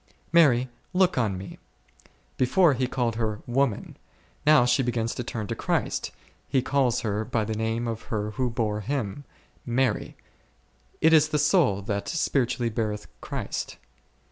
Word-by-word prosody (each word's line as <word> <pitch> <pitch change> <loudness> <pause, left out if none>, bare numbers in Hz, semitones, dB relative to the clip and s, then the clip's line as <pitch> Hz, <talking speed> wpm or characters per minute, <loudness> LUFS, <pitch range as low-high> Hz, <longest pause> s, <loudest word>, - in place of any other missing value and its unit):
Mary, 130 -7 +5 0.3
look 185 0 +3
on 110 -7 0
Me; 95 +1 -9 0.8
before, 150 +5 +4
He 130 0 0
called 120 -3 -1
her 110 -2 -2
woman; 125 -3 -1 0.5
now 150 -5 +7
she 125 +2 +3
begins 115 -2 -1
to 125 - -4
turn 110 -2 -4
to - - -3
Christ, - - -1 0.4
He 130 -2 +1
calls 130 -4 +1
her 105 -1 -1
by 110 -1 -1
the 110 - -3
name 115 +2 -1
of 115 -1 -3
her 105 -1 -2
who 125 +2 -1
bare 110 -3 -1
Him, 135 +2 -3 0.4
Mary; 130 +2 0 0.9
it 160 +1 +5
is 155 -1 +6
the 150 - +1
soul, 145 - +3
that 100 0 -3
spiritually 125 -6 0
beareth 105 -1 -2 0.2
Christ. - - -4
120 Hz, 150 wpm, -26 LUFS, 110-135 Hz, 0.9 s, now